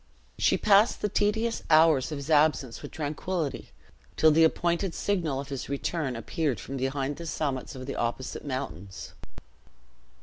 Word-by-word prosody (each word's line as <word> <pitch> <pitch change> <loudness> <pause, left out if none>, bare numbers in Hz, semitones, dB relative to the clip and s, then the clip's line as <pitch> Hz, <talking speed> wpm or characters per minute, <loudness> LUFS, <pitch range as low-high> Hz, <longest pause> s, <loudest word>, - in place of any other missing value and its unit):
She - - +3
passed 210 +2 +4
the 210 - +1
tedious 220 +4 0
hours 155 -3 +5
of 150 - -3
his 140 +3 -5
absence 145 -5 +2
with - - -7
tranquillity, 155 +1 -3 0.5
till 160 - +6
the 160 +2 +5
appointed 170 +2 +1
signal 165 -9 -1
of 140 0 -7
his 135 -2 -5
return 140 -1 -2
appeared 135 +4 -2
from 135 - -7
behind 135 +2 -2
the 170 - -7
summits 140 -5 -3
of 130 0 -7
the - - -5
opposite 120 +2 -3
mountains. 130 -9 -6
150 Hz, 155 wpm, -27 LUFS, 135-170 Hz, 0.5 s, till